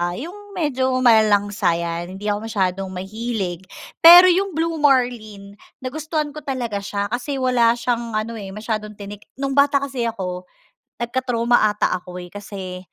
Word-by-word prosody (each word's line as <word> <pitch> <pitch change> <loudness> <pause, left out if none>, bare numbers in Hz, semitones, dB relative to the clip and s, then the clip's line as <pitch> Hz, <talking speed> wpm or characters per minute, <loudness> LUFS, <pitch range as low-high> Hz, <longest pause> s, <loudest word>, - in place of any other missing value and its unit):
yung 400 - -9
medyo 260 -6 0
malalangsa 205 -5 +3
yan, 170 +2 -4
hindi 200 - -10
ako 210 +2 -3
masyadong 195 -3 -1
mahilig 190 -1 -5 0.3
pero 355 +2 +10
yung 380 -1 0
Blue 325 0 -1
Marlin, 220 -8 0 0.2
nagustuhan 305 +2 -3
ko 305 - -8
talaga 250 -8 -3
siya 200 +1 -4
kasi 250 +4 -3
wala 250 -3 +2
siyang 235 -1 -2
ano 215 +2 -2
eh, 195 -1 -8
masyadong 215 -1 -4
tinik. 205 0 -10
Nung 275 0 -3
bata 280 0 +3
kasi 260 -4 -2
ako, 180 -5 -5 0.6
nagka-trauma 240 -1 +1
ata 210 0 0
ako 180 0 -9
eh, 175 - -11
kasi, 195 -2 -7
230 Hz, 150 wpm, -21 LUFS, 200-270 Hz, 0.6 s, pero